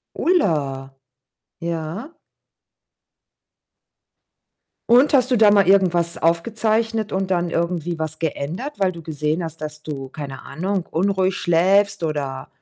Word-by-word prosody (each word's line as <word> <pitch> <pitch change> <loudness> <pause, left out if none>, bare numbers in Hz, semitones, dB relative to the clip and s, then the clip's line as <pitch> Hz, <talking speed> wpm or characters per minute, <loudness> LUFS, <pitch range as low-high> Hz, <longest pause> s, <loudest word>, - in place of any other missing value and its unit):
Ulla. 145 - 0 0.7
Ja. 170 - -5 2.7
Und 255 +5 +5
hast 255 -1 +4
du 250 - +4
da 210 -1 +6
mal 200 -3 +4
irgendwas 175 -3 +3
aufgezeichnet 220 +5 0
und 190 0 -1
dann 175 -1 +1
irgendwie 170 0 -2
was 155 0 -4
geändert, 165 - -3
weil 190 -2 +2
du 170 - -10
gesehen 155 +1 -2
hast, 160 -1 -7
dass 150 0 -6
du 135 -3 -6
keine 140 -2 -8
Ahnung, 185 +5 -3
unruhig 190 +1 +1
schläfst 195 +3 +2
oder 140 -3 -3
170 Hz, 120 wpm, -21 LUFS, 155-200 Hz, 2.7 s, da